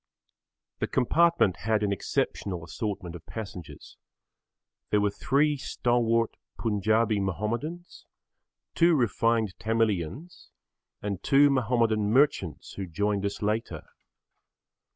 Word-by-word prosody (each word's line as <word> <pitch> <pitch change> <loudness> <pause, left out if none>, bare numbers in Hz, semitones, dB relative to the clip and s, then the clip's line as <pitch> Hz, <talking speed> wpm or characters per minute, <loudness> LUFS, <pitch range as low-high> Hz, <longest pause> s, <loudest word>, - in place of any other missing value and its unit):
The - - -1
compartment 165 - +3
had 105 +5 0
an 100 - +1
exceptional 90 -1 -2
assortment 95 0 -4
of 85 - -10
passengers. 95 -7 -9 0.9
There 105 - +3
were 100 0 +1
three 145 +7 +1
stalwart 115 -3 0 0.2
Punjabi 110 0 +1
Mahomedans, 115 - -4 0.7
two 170 0 +4
refined 115 -4 +1
Tamilians 115 - -2 0.5
and 100 -3 -3
two 140 +1 +5
Mahomedan 115 -5 +1
merchants 130 - +1
who 95 -2 -5
joined 100 +4 -1
us 100 - -6
later. 105 -7 -2
110 Hz, 100 wpm, -27 LUFS, 100-125 Hz, 0.9 s, two